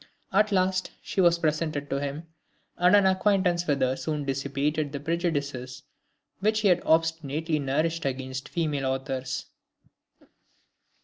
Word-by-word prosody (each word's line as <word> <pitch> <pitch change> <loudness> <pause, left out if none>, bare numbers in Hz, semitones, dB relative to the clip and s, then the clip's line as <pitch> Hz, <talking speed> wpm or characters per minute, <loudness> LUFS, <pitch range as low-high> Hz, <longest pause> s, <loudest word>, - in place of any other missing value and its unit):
At 210 +2 +3
last 185 -1 +1
she 190 - 0
was 170 -1 +5
presented 155 -2 -1
to 140 - 0
him, 145 +3 -4 0.5
and 180 +3 +5
an 200 -1 +5
acquaintance 185 -2 +2
with 145 -2 +1
her 130 0 +2
soon 150 0 -3
dissipated 140 +2 -1
the 140 - -4
prejudices 145 -5 -2 0.6
which 215 +2 +1
he 205 - +4
had 175 -1 +4
obstinately 160 -1 +1
nourished 155 +4 -1
against 130 0 -4
female 150 -6 -1
authors. 130 0 -3
155 Hz, 130 wpm, -27 LUFS, 140-175 Hz, 0.6 s, was